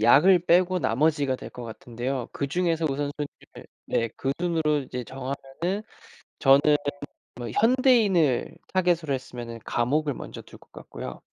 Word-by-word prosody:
약을 170 - +6
빼고 180 +1 +4
나머지가 140 +2 +1
될 - - -9
것 125 - -8
같은데요. 120 +3 -4
그중에서 165 +3 0
우선순위를 145 +1 -5 0.2
네 115 0 0
그 135 +1 -1
순으로 160 -4 +1
이제 125 -2 -6
정하면은 135 +3 -5 1.1
저는 145 +2 +6 0.6
뭐 120 -1 -5
현대인을 220 - +3 0.2
타깃으로 170 -5 +2
했으면은 120 -3 -6
감옥을 145 +4 0
먼저 - - -8
둘 - - -15
것 - - -23
같고요. - - -8
145 Hz, 310 characters per minute, -26 LUFS, 125-170 Hz, 1.1 s, 약을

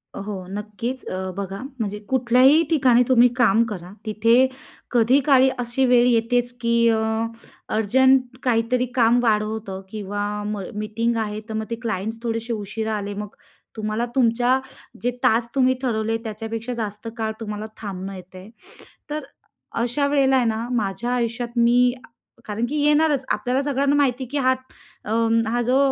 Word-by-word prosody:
अ, - - -5
हो 195 -3 -5
नक्कीच. 215 +5 -5
अ, 185 0 -4
बघा 195 +1 -5 0.2
म्हणजे 210 -1 -3
कुठल्याही 260 +4 +5
ठिकाणी 255 -6 +4
तुम्ही 245 -1 +6
काम 230 -2 +4
करा, 180 -4 -7
तिथे 230 +4 +4 0.4
कधीकाळी 260 +2 +4
अशी 245 +2 0
वेळ 245 -1 +5
येतेच, 245 +1 +2
की 235 0 +1 0.2
अ, 220 -1 +2 0.7
अर्जंट 255 +3 +3
काहीतरी 245 +1 +1
काम 240 0 +4
वाढवतं 215 -3 -1
किंवा 205 -1 -4 0.2
म 210 -1 -3 0.2
मीटिंग 215 +3 -1
आहे, 215 -1 -2
तर - - -4
मग 220 0 -2
ते - - 0
क्लाइंट्स 220 0 -3
थोडेसे 230 0 -2
उशिरा 220 +1 -3
आले, 205 0 -4
मग 210 0 -7 0.4
तुम्हाला 215 +2 -2
तुमच्या 245 +1 +3 0.4
जे 245 +1 0
तास 230 +1 +3
तुम्ही 260 -1 +4
ठरवले 225 -3 0
त्याच्यापेक्षा 225 +2 -5
जास्त 215 -1 -5
काळ 220 -1 -1
तुम्हाला 210 -1 -5
थांबणं 195 -2 -6
येत 185 0 -12
आहे. 185 +3 -11 0.6
तर 305 +1 -3 0.6
अशा 280 +4 +1
वेळेला 275 -2 +3
आहे 250 -2 +3
ना, 225 +1 -1
माझ्या 230 +1 -1
आयुष्यात 235 0 -2
मी 245 +1 +4 0.5
कारण 220 +3 -2
की 300 - -3
येणारच. 295 -2 +3
आपल्याला 255 +2 0
सगळ्यांना 280 0 +1
माहिती, 265 -2 +1
की 290 - -1
हा 260 -1 +3 0.5
अ, 210 - -4 0.4
हा 240 +2 0
जो 250 +3 +2
230 Hz, 155 wpm, -22 LUFS, 215-250 Hz, 0.7 s, तुम्ही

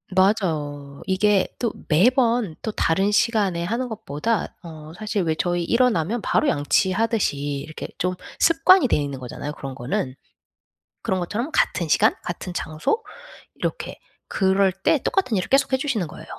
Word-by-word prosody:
맞아요. 155 -8 0
이게 195 +1 +2
또 235 -3 -1 0.2
매번 230 - +3
또 220 - -3
다른 195 +1 +1
시간에 205 -5 +2
하는 240 +6 -2
것보다 220 0 -2
어 155 -2 -10
사실 210 -2 -1
왜 160 -2 0
저희 175 +1 0
일어나면 235 -3 +1
바로 305 - +1
양치하듯이 200 - +1
이렇게 145 +2 -5
좀 180 +1 0 0.3
습관이 330 0 +5
돼 - - +2
있는 140 -2 -3
거잖아요 130 +3 -6
그런 135 -2 -7
거는. 130 +1 -3 0.9
그런 190 - -1
것처럼 220 - -3
같은 175 - +1
시간 - - +4
같은 175 +1 -5
장소 165 - -2 0.5
이렇게 - - -4 0.3
그럴 190 0 +2
때 195 - +1
똑같은 255 - +1
일을 185 - -2
계속해 270 -1 +3
주시는 255 - -1
거예요. - - -11
190 Hz, 320 characters per minute, -23 LUFS, 155-230 Hz, 0.9 s, 습관이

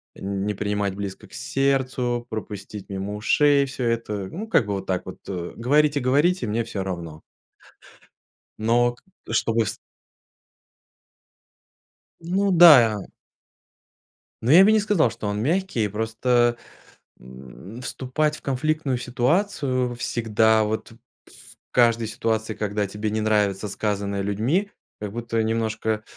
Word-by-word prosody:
не 100 +1 -3
принимать 100 -1 -2
близко 100 -1 -6
к - - -22
сердцу, 130 -3 -1
пропустить 105 -2 -7
мимо 100 +1 -4
ушей 140 +6 +3
всё 130 -1 -5
это. 115 -4 -2
Ну, 215 +6 -6
как 130 - +2
бы 100 - -1
вот 95 -1 -4
так 90 -1 -2
вот, - - -8
э, 90 -3 -5
"говорите-говорите, 145 +4 +2
мне 110 +2 -1
всё 105 -4 -4
равно". 85 -4 -6 1.4
Но 120 +2 +2
к - - -26 0.3
чтобы 115 0 +1
с - - -3 2.4
Ну 190 +4 0
да. 130 - +7 1.4
Но 120 - +2
я 180 +5 +9
бы 215 - +5
не 215 - +4
сказал, 200 - +2
что 110 -2 -6
он 105 +1 -2
мягкий. 160 - 0
Просто, 120 +3 +1 0.6
м, 65 - -12
вступать 150 +5 -2
в - - -19
конфликтную 140 0 -1
ситуацию 130 - 0
всегда, 110 -2 +2
вот 110 +1 -4
в 115 - -16 0.7
каждой 115 -2 +3
ситуации, 110 0 -2
когда 105 -1 -2
тебе 105 +2 -4
не 110 0 -1
нравится 105 -2 +1
сказанное 100 -1 -2
людьми, 125 - 0 0.3
как 105 -1 -6
будто 115 -1 -2
немножко, 110 0 -2
м, 110 -1 -1
115 Hz, 130 wpm, -23 LUFS, 105-130 Hz, 2.4 s, я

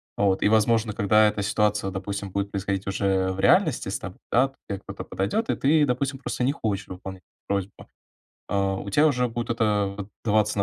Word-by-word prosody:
вот, 95 -2 +1
и - - +4
возможно 110 0 +3
когда 105 +1 +4
эта 105 -1 -1
ситуация, 105 0 +1
допустим, 100 0 -5
будет 100 +1 -2
происходить 100 0 -2
уже 95 -1 0
в 95 - -6
реальности - - +3
с - - -2
тобой, - - -9
да. 130 +3 +4
То 135 - -26
те 100 - -2
кто-то - - -8
подойдет, 100 - -1
и - - +2
ты, 150 +2 +3
допустим, 135 +1 -1
просто 125 - -3
не 130 - +3
хочешь 105 - -3
выполнять 95 0 -8
эту - - -83
просьбу. 100 -1 -3 0.6
А, 100 -1 +1
у 100 - -6
тебя 150 +10 +4
уже 125 -4 +2
будет 120 0 -4
это 105 -4 +1
вот 100 -1 -6 0.2
даваться, 105 -1 +2
вот, 100 - +4
105 Hz, 210 wpm, -25 LUFS, 100-115 Hz, 0.6 s, и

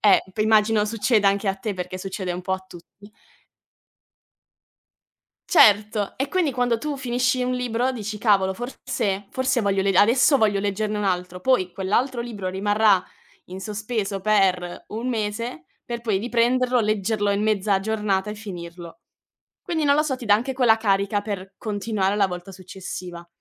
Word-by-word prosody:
Eh, 205 -2 +5 0.2
immagino 215 0 +3
succeda 215 -1 +1
anche 200 +1 0
a 195 - 0
te 200 +1 -4
perché 180 0 -5
succede 190 0 -5
un 175 +1 -3
po' 190 - -2
a 190 0 -3
tutti. 200 +4 -15 2.4
Certo, 210 - +4
e 270 +2 -2
quindi 350 -2 +1
quando 245 -2 +1
tu 295 +2 -4
finisci 250 0 0
un 250 0 -1
libro 250 +1 -1
dici: 215 -3 -5
"Cavolo, 195 -4 +2
forse 230 -4 -3
forse 260 -1 0
voglio 195 -2 +1
le 195 - +2
adesso 250 - +5
voglio 210 -2 +2
leggerne 205 +1 -1
un 210 - -2
altro". 180 -1 -2
Poi 185 -6 +2
quell'altro 235 +6 0
libro 210 -6 -5
rimarrà 205 0 +2 0.4
in 185 +1 -8
sospeso 210 -1 -3
per 190 -4 +1
1 230 +4 -4
mese 215 -6 -3 0.2
per 235 -1 -5
poi 220 -4 0
riprenderlo, 245 +2 +2
leggerlo 210 -1 0
in 200 +1 0
mezza 210 -2 +1
giornata 210 -1 -1
e 210 - -5
finirlo. 175 -3 -9 0.6
Quindi 320 -3 -1
non 285 0 +4
lo 305 - +3
so, 280 -4 -1
ti 250 - -9
dà 205 -1 +6
anche 250 +5 -2
quella 245 -4 +4
carica 200 -1 +1
per 195 -2 -6
continuare 205 -2 -1
la 200 -2 +3
volta 180 +1 -7
successiva. 180 -2 -8
210 Hz, 160 wpm, -23 LUFS, 195-235 Hz, 2.4 s, dà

